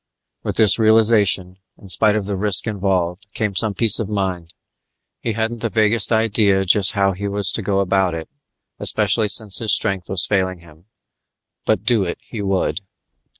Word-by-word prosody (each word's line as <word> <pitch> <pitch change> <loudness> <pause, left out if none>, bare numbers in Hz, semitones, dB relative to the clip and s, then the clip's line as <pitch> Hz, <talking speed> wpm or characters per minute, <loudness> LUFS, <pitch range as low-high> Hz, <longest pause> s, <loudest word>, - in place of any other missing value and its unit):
With - - -5
this 110 +1 +4
realization, 110 -4 +3 0.2
in 100 - -15
spite 105 +3 +2
of 105 -2 -2
the 100 0 -3
risk 100 0 +2
involved, 95 -2 -2
came 105 -2 -2
some 105 +1 0
peace 115 -4 +3
of 110 -3 -4
mind. 95 -5 -4 0.6
He 115 - -3
hadn't 115 +2 -3
the 115 - -3
vaguest 110 +1 +2
idea 105 -3 +1
just 95 +1 +3
how 100 -2 +1
he 100 +2 -5
was 100 -1 -1
to - - -2
go 100 -1 -1
about 95 -2 0
it, 80 -1 -7 0.5
especially 110 - +2
since 105 -1 +3
his 110 -4 +1
strength 95 -2 -2
was 95 -3 0
failing 95 -2 -1
him, 80 0 -19 0.8
but 105 -3 0
do 110 -2 +1
it 85 - -5
he 110 - -8
would. 95 -2 -1
100 Hz, 175 wpm, -19 LUFS, 95-110 Hz, 0.8 s, this